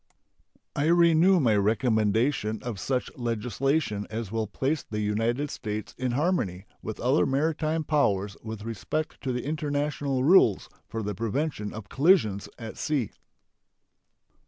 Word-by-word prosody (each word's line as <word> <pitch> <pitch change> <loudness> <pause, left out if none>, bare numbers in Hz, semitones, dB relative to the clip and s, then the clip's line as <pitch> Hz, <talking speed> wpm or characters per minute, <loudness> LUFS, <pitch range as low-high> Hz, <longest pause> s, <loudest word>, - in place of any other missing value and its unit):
I 145 +2 +1
renew 170 +2 +5
my 115 -8 +3
recommendation 110 +2 +1
of 120 -5 -4
such 130 -2 -2
legislation 120 0 -1
as 110 -2 -4
will 110 -1 -1
place 135 +8 -1
the 105 - -5
United 115 +7 0
States 105 -1 -5
in 125 -1 -2
harmony 120 - 0 0.2
with 110 - -6
other 130 +5 +2
maritime 155 +3 0
powers 105 -10 +1
with 110 -2 -7
respect 115 +8 -4
to 130 - -2
the 125 0 -3
international 145 -3 -1
rules 140 - +5 0.2
for 115 -1 -4
the 105 0 -2
prevention 115 - -2
of 110 -2 -8
collisions 135 - +3
at 115 -2 -8
sea. 140 -9 -1
120 Hz, 135 wpm, -27 LUFS, 105-150 Hz, 0.2 s, renew